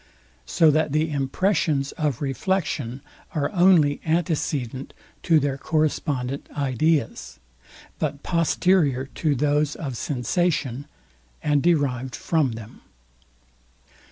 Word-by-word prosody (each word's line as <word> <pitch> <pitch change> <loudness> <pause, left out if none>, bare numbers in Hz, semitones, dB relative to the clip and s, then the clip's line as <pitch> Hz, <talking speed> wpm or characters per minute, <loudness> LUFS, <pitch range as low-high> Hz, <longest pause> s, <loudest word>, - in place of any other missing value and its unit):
So 165 -3 +4
that 155 -1 +1
the 155 +1 +1
impressions 140 0 0
of 150 -4 -2
reflexion 140 -4 -2 0.3
are 145 -2 0
only 175 -6 +4
antecedent 150 -6 -2 0.3
to 160 -2 +4
their 140 -1 -2
correspondent 145 -4 -1
ideas; 135 - 0 0.6
but 140 - -3
posterior 165 -5 +2
to 150 -3 0
those 145 +2 +1
of 135 -6 -5
sensation, 145 0 -1 0.6
and 145 -1 +2
derived 135 -7 +1
from 155 -7 0
them. 110 -1 -10
145 Hz, 100 wpm, -24 LUFS, 135-160 Hz, 0.6 s, So